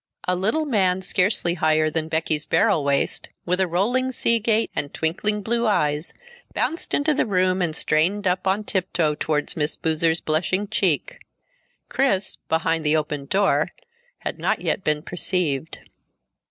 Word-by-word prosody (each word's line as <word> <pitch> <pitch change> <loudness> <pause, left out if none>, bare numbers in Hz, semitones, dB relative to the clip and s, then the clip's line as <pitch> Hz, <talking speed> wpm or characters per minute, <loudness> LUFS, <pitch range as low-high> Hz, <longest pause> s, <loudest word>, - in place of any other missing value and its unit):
A 180 - +2
little 220 - 0
man 190 -8 +1
scarcely 185 -2 +1
higher 155 -2 +2
than 160 0 -1
Becky's 160 -1 -1
barrel 150 - +3
waist, 140 0 0 0.2
with 180 +1 0
a 190 - +2
rolling 240 +10 +1
sea 235 -2 +2
gait 225 +1 +1
and 145 - -2
twinkling 205 +6 -1
blue 235 +2 0
eyes, 150 -6 +1 0.4
bounced 330 - -1
into 300 +1 +2
the 285 - 0
room 185 -1 +1
and 165 -3 -1
strained 185 +7 +1
up 185 +1 0
on 195 +3 +1
tiptoe 180 -6 0
toward 150 0 -2
Miss 150 -1 -1
Boozer's 160 +1 +1
blushing 185 +6 0
cheek. - - 0 0.7
Chris, 200 -8 0
behind 160 0 +1
the 150 +1 +3
opened 150 -2 -3
door, 200 +1 +2 0.5
had - - -4
not - - 0
yet - - -1
been 150 -1 0
perceived. 170 -5 -2
180 Hz, 155 wpm, -23 LUFS, 155-205 Hz, 0.7 s, barrel